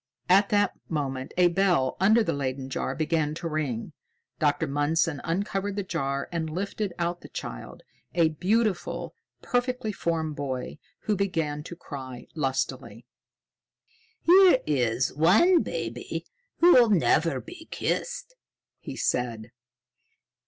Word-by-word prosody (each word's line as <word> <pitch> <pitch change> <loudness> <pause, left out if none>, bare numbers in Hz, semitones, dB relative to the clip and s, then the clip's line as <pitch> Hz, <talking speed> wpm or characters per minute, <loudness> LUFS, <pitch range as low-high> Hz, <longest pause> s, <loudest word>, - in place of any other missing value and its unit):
At 195 +2 +5
that 205 -1 +2 0.2
moment 135 -4 -3
a 180 -1 +5
bell 175 -7 +2
under 215 +5 +5
the - - -1
Leyden 135 -1 -3
jar - - -2
began 155 -1 0
to 170 - -4
ring. 150 -8 -3 0.5
Dr. 150 +2 +2
Mundson 145 +1 0
uncovered 195 +3 -2
the 200 - -2
jar 140 -6 -2
and 165 -2 -2
lifted 195 +4 -3
out 175 0 -2
the - - -12
child, - - -7 0.3
a 165 -2 +4
beautiful, 190 +4 -1 0.3
perfectly 245 -3 -1
formed 160 -5 -2
boy, 135 0 -4 0.2
who 210 - 0
began 165 -7 -1
to 175 - -7
cry 130 -7 -8
lustily. 130 -5 -3 1.2
"Here 365 -3 +7
is 130 -3 +1
one 215 - +5
baby - - -4 0.4
who'll 255 -10 +7
never 165 -6 +3
be 335 -1 -11
kissed," - - -3 0.5
he - - -7
said. 115 -2 -2
165 Hz, 125 wpm, -27 LUFS, 140-200 Hz, 1.2 s, Here